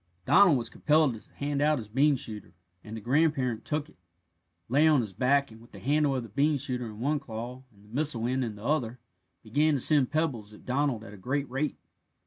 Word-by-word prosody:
Donald 180 -8 +6
was 115 -2 -4
compelled 150 -3 +3
to 110 - -13
hand 145 0 -2
out 150 +1 +3
his 110 -5 -6
bean 140 +7 +3
shooter, 110 -6 -6 0.3
and 110 +1 -7
the - - -7
grandparent 130 -2 +1
took 150 -1 -2
it, 160 - -22 0.7
lay 145 +6 +4
on 150 -4 +5
his 105 -4 -6
back, 135 +5 +2
and 110 +1 -14
with 120 - -19
the - - -10
handle 145 +1 +1
of 130 - -2
the 115 - -10
bean 145 +7 +2
shooter 125 -3 -3
in 105 -1 -10
one 145 +5 0
claw 120 0 -7
and 100 -1 -22
the - - -19
missile 140 -6 0
end 130 +2 0
in 110 -3 -4
the 105 - -12
other 125 -5 -1 0.4
began 145 +7 +2
to - - 0
send 140 -1 +3
pebbles 130 -9 -2
at - - -18
Donald 130 -3 0
at 105 - -11
a - - -11
great 135 +8 -2
rate. 135 +3 -2
130 Hz, 225 wpm, -28 LUFS, 115-150 Hz, 0.7 s, Donald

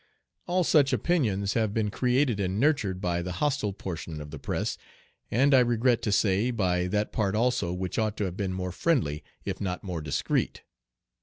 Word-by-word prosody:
All 180 +1 +2
such 140 -4 +4
opinions 105 - +1
have 110 -3 0
been 105 -2 0
created 125 -1 +1
and 95 +1 -1
nurtured 110 -10 +1
by 85 -2 0
the 90 +1 -4
hostile 140 -3 0
portion 85 -5 -6
of 75 0 -8
the - - -7
press, - - -2 0.5
and, 135 +5 +3
I 130 - +8
regret 120 0 +2
to 105 - -1
say, 100 +3 +2
by 90 -6 0
that 105 +3 -1
part 105 -2 0
also 110 -6 +1
which 90 +2 -3
ought 110 -1 0
to - - -1
have 90 -3 -3
been 95 -2 -2
more 90 0 -3
friendly, 90 - 0 0.2
if - - -4
not 90 -2 -3
more 90 -5 -4
discreet. 75 -2 -1
105 Hz, 185 wpm, -27 LUFS, 90-125 Hz, 0.5 s, I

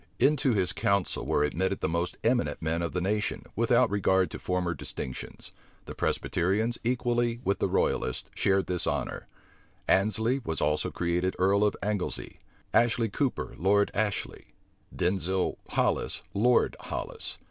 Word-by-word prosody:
Into 140 -3 +3
his 95 -4 +1
council 100 -2 0
were 75 - +2
admitted 95 +6 0
the - - 0
most 85 +2 -2
eminent 115 - +1
men 80 +1 -1
of 85 - -2
the 90 - -1
nation, 105 +3 -1
without 120 +1 +3
regard 95 -3 +2
to - - -6
former 90 -1 -1
distinctions: 65 -5 -7 0.3
the - - -7
Presbyterians, 105 +7 0
equally 120 -1 0
with 100 - 0
the - - +2
royalists, 65 - 0
shared 95 0 +2
this 90 -1 -1
honor. - - -2 0.6
Annesley 110 +7 +2
was 80 -5 -3
also 75 +1 +1
created 90 +2 -1
earl 100 +2 +3
of 105 - +2
Anglesey; 100 -3 -3 0.3
Ashley 115 -1 +3
Cooper, 135 +5 -1
Lord 100 +3 +3
Ashley; 105 -1 -3 0.4
Denzil 95 0 0
Hollis, - - 0
Lord 120 +4 +3
Hollis. - - -4
100 Hz, 140 wpm, -28 LUFS, 90-115 Hz, 0.6 s, Into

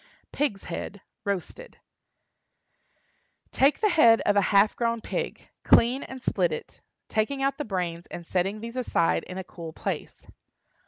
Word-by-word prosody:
PIG'S 230 -10 -1
HEAD 185 +3 -6 0.2
(Roasted). 200 - -4 1.7
Take 275 +8 +3
the 425 - +4
head 235 - +6
of 205 - +2
a 200 - +5
half 200 +1 +4
grown 230 -1 0
pig; - - -4
clean 250 +4 +5
and 265 - -8
split - - +1
it, 470 0 -7 0.3
taking 270 +6 -1
out 275 +1 0
the 295 - -2
brains 175 -4 -3
and 170 - -8
setting 190 +5 -1
these 230 +1 -7
aside 240 -9 +1
in 185 - -8
a 190 - -4
cool 165 -3 -9
place. - - -5
220 Hz, 150 wpm, -27 LUFS, 190-270 Hz, 1.7 s, head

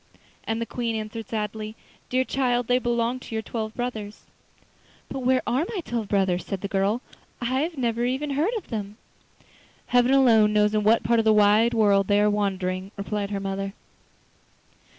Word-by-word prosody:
And 225 0 -1
the 230 - -2
Queen 235 -1 -3
answered 220 0 -5
sadly: 215 0 -4 0.3
'Dear 255 +1 +2
child, 250 -2 0
they 250 +2 +2
belong 240 0 0
to 230 - -8
your 220 - -2
twelve 220 -1 -4
brothers.' 220 -4 -5 0.9
'But 270 - -3
where 255 0 +2
are 255 +6 +1
my 400 -6 -3
twelve 235 -8 -3
brothers?' 190 -3 +1
said 195 -2 -5
the 200 - -3
girl. 200 +5 0 0.4
'I 240 - -4
have 280 +7 -1
never 235 -2 0
even 265 +4 -1
heard 320 - 0
of 430 - -9
them.' 210 -2 -5 0.9
'Heaven 245 +1 +3
alone 225 -6 +5
knows 210 0 +3
in 215 - +2
what 220 +2 +4
part 235 0 +3
of 225 - +1
the 220 - +5
wide 210 +3 +4
world 200 -3 +3
they 205 0 +3
are 210 0 +3
wandering,' 190 -2 -1
replied 200 0 -3
her 200 -1 -2
mother. 195 0 -3
220 Hz, 180 wpm, -25 LUFS, 205-245 Hz, 0.9 s, alone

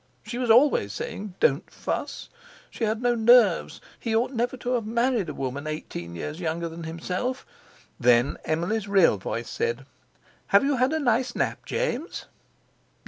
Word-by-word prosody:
She 240 - -5
was 250 -2 -1
always 225 - +5
saying: 195 -2 -6
"Don't 140 +7 +2
fuss!" - - -4 0.4
She 230 - -2
had 220 +2 -1
no 245 0 +3
nerves; 230 -4 +4 0.2
he 225 -2 -1
ought 235 +3 +1
never 245 +2 -1
to 245 0 -3
have 230 -4 -1
married 235 -4 +1
a - - -4
woman 135 +2 -4
eighteen 85 - -6
years 150 - -5
younger 170 0 -2
than 165 0 -8
himself. 180 +10 -3 0.5
Then 120 +1 +3
Emily's 180 +7 -1
real 195 - +4
voice 115 +4 -4
said: 120 +3 -2 0.6
"Have 200 - +5
you 280 -1 +1
had 255 +3 +2
a 315 - +1
nice 245 -2 +1
nap, - - -2
James?" 350 - -2
210 Hz, 160 wpm, -26 LUFS, 155-245 Hz, 0.6 s, always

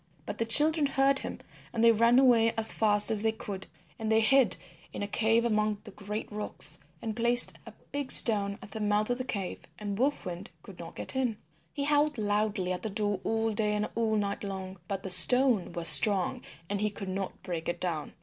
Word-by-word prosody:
But - - -7
the 230 - -1
children 300 +4 +4
heard 275 0 +1
him - - -7 0.3
and 230 -1 -2
they 230 - +6
ran 230 +2 +3
away 235 -4 +3
as 225 0 +6
fast 210 -1 +4
as 215 -2 -1
they 220 0 0
could, 200 -3 -8 0.3
and 220 0 -3
they 220 - +3
hid 240 -2 +2 0.3
in - - -6
a - - -4
cave 225 +2 0
among 215 -2 -1
the 210 - -12
great 210 +2 -7
rocks 210 0 -3 0.2
and 220 -2 -5
placed 240 +1 +2
a - - -11 0.2
big 285 -2 -2
stone 200 -3 +4
at - - -13
the 220 - -7
mouth 210 +2 -1
of 245 - -3
the - - -3
cave 200 -7 -6
and 205 -1 -6
Wolf 280 +3 -1
Wind 180 +2 -7
could 195 -4 -14
not 165 -1 -10
get - - -3
in. 250 -5 -2 0.3
He 285 - -5
howled 295 0 0
loudly 205 -3 -2
at 180 - -4
the 220 - -4
door 205 -1 -3
all 225 0 -2
day 210 0 -1
and 210 0 -3
all 225 -1 -1
night 200 -1 -3
long, 190 -2 -7
but 195 -1 -5
the 190 - -4
stone 240 +2 +5
was 170 -1 +2
strong 190 +3 +5 0.3
and 205 +1 -4
he 210 - 0
could 200 -1 -9
not 190 0 -6
break 170 -2 -5
it 175 - -4
down. 165 -5 -4
215 Hz, 215 wpm, -28 LUFS, 200-230 Hz, 0.3 s, they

